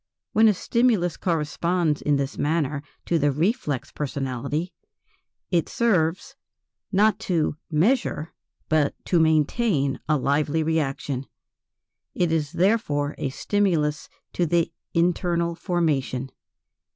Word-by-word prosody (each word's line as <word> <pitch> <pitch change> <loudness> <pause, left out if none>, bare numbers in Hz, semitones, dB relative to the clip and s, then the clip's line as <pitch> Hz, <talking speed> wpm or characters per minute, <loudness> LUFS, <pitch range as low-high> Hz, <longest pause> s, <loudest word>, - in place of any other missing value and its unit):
When 220 +1 +6
a 215 - +5
stimulus 215 -6 +1
corresponds 165 -1 0
in 150 - +2
this 140 0 -2
manner 150 -2 0 0.2
to 170 - +1
the 145 0 +3
"reflex 155 - -1
personality," 140 +4 -3 0.8
it 170 -3 +1
serves, 180 -7 +1 0.6
not 210 +2 +3
to 160 -4 +1
measure 165 - +1 0.3
but 155 -2 +2
to 175 - +2
maintain 155 - +2
a 155 - +4
lively 145 +3 +1
reaction; 140 -4 -1 0.9
it 175 -2 +1
is 155 -1 -1
therefore 170 -6 +1
a 135 - -1
stimulus 160 -2 0 0.2
to 175 - +1
the 170 +1 +1 0.2
"internal 170 0 +1
formation." 150 -7 -1
160 Hz, 110 wpm, -24 LUFS, 145-180 Hz, 0.9 s, When